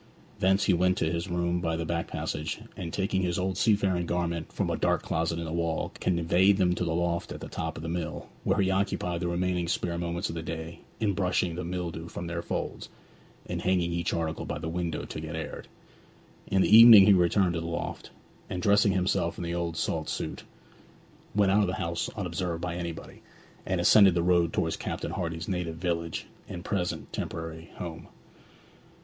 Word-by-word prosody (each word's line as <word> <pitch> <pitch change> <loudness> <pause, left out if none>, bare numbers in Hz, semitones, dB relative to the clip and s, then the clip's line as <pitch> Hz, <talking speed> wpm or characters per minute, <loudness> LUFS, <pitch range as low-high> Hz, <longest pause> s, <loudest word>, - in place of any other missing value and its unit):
Thence 95 +1 +3
he 95 - +3
went 90 +1 +2
to 80 - 0
his 85 +2 -3
room 85 0 0
by 80 -1 0
the 85 0 -2
back 85 0 -2
passage, 75 +6 -3 0.2
and 85 -5 -5
taking 95 0 0
his 90 -2 0
old 95 0 -1
seafaring 95 -4 +2
garments 85 -2 -2
from - - 0
a - - 0
dark - - +1
closet 80 +1 -1
in 85 - -3
the 80 - -4
wall 85 -1 -1
conveyed 90 +3 +3
them 90 -3 +3
to 90 - -2
the 80 -1 -1
loft 85 0 -1
at - - -6
the - - -7
top - - -4
of 80 - -7
the - - -4
mill, 85 -1 -4 0.2
where 95 - +1
he 95 -1 +3
occupied 95 -3 0
the 90 - -1
remaining 90 0 0
spare 85 0 -1
moments 85 +2 -2
of - - -5
the 80 - -4
day 80 0 -6 0.2
in 105 -3 +1
brushing 90 -2 0
the 90 +2 -4
mildew 85 -2 -4
from 85 - -6
their 85 0 -3
folds, - - -4 0.6
and - - -4
hanging 90 -2 +1
each 85 0 -1
article 80 -1 -2
by - - -4
the 80 +2 -5
window 85 -1 -3
to - - -6
get 80 +1 -5
aired. 80 -1 -6 0.8
In 95 -1 +3
the 110 - +6
evening 115 -3 +11
he 100 - +7
returned 90 0 +3
to 85 - -2
the 85 - -4
loft, 85 0 -4 0.4
and 90 - -3
dressing 100 +1 +4
himself 90 -2 0
in - - -4
the 85 0 -3
old 85 -1 -2
salt - - -1
suit, - - -4 0.9
went 100 -2 +4
out 105 +2 +4
of 100 - +2
the 90 - -1
house 85 0 -2
unobserved 90 -3 -2
by 90 -2 -2
anybody, 85 -2 -6 0.5
and 95 - 0
ascended 95 +1 +6
the 85 - +2
road 85 -2 +3
towards - - -1
Captain - - -4
Hardy's 80 -3 -3
native 90 -3 -2
village 85 -1 -2 0.2
and 85 +2 -7
present 95 -4 -2
temporary 80 0 -5
home. 85 -3 -7
85 Hz, 205 wpm, -28 LUFS, 85-95 Hz, 0.9 s, evening